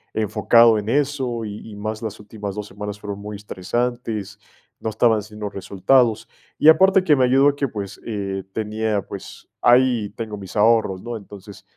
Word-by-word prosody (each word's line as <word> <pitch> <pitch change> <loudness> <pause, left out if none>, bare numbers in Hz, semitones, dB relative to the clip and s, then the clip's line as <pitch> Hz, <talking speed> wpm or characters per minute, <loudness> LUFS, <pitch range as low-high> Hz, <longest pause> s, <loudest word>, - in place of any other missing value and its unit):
enfocado 110 +1 +4
en 105 - -5
eso 130 -4 -1
y 105 +1 -8
y 105 - -10
más 110 +2 -5
las 110 -2 -5
últimas 105 -1 -7
2 105 - -5
semanas 105 +1 -7
fueron 100 -1 -6
muy 105 0 -7
estresantes, 105 +1 -3 0.4
no 110 - -3
estaba 110 +1 +3
haciendo 105 0 -7
resultados. 110 +5 +1 0.3
Y 150 - +3
aparte 190 +4 +6
que 155 -5 +4
me 130 -2 +3
ayudó 135 +3 +5
a 145 - -2
que, 140 -1 -1
pues, 100 -3 -7
eh, 100 -3 -3
tenía, 110 -2 -1
pues, - - -10
ahí 120 -4 +4
tengo 110 -2 -5
mis 95 -1 -10
ahorros, 105 -3 +3
¿no?, 120 0 -5
entonces, 100 -2 -11
110 Hz, 175 wpm, -21 LUFS, 105-120 Hz, 0.4 s, aparte